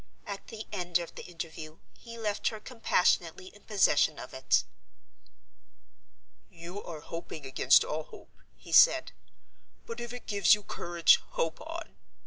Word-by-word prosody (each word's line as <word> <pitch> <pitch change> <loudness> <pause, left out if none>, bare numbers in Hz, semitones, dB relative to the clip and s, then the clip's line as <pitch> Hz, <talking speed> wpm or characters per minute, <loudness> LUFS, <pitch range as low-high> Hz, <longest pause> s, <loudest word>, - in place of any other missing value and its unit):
At 200 -1 -7
the 220 -1 -8
end 175 -1 0
of 170 -1 -7
the - - -9
interview 160 -2 -8 0.2
he 230 -1 -11
left 210 -2 -2
her 220 - -2
compassionately 185 -7 0
in 205 - -19
possession 210 -3 +3
of - - -9
it. - - +2 1.9
"You 175 +3 -9
are 160 -3 -8
hoping 165 -2 -8
against 130 +1 +4
all 155 0 -4
hope," - - -15 0.2
he - - -13
said; - - +6 0.7
"but 230 +1 -7
if 240 0 -6
it 245 0 -9
gives 200 -2 +5
you 210 - -12
courage, 170 -3 +3 0.2
hope 165 0 -2
on. 330 +1 -8
180 Hz, 145 wpm, -30 LUFS, 165-215 Hz, 1.9 s, said